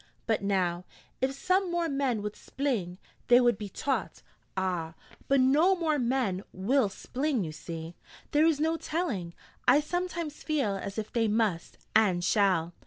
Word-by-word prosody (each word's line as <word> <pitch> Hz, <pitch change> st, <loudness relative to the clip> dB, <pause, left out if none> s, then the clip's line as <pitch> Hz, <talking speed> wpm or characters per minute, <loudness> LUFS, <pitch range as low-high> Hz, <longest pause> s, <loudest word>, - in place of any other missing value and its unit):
But 220 Hz, -3 st, +1 dB
now, 185 Hz, -3 st, 0 dB, 0.4 s
if 260 Hz, +1 st, +2 dB
some 370 Hz, +5 st, +1 dB
more 345 Hz, -1 st, 0 dB
men 270 Hz, -7 st, 0 dB
would 210 Hz, 0 st, -3 dB
spling, 225 Hz, -11 st, -3 dB, 0.3 s
they 245 Hz, 0 st, +7 dB
would 240 Hz, -4 st, +3 dB
be 205 Hz, -2 st, -5 dB
taught 270 Hz, +7 st, -3 dB, 0.2 s
' -, -, -41 dB
'Ah, 175 Hz, -4 st, -2 dB, 0.3 s
but 275 Hz, 0 st, +4 dB
no 300 Hz, +9 st, +5 dB
more 315 Hz, -4 st, 0 dB
men 240 Hz, -7 st, 0 dB
will 215 Hz, +5 st, +1 dB
spling, 260 Hz, +3 st, -2 dB
you 155 Hz, -, -5 dB
see 165 Hz, +1 st, -7 dB, 0.2 s
!' -, -, -21 dB
'There 300 Hz, +2 st, +4 dB
is 315 Hz, -3 st, +2 dB
no 320 Hz, +2 st, +1 dB
telling. 245 Hz, -, -3 dB, 0.3 s
I 255 Hz, +4 st, +7 dB
sometimes 340 Hz, -1 st, -3 dB
feel 275 Hz, -10 st, 0 dB
as 200 Hz, +1 st, -6 dB
if 215 Hz, -1 st, -4 dB
they 230 Hz, -2 st, +2 dB
must, 210 Hz, -6 st, 0 dB, 0.2 s
and 190 Hz, -5 st, +4 dB
shall. 185 Hz, -4 st, +2 dB
235 Hz, 170 wpm, -29 LUFS, 190-295 Hz, 0.4 s, they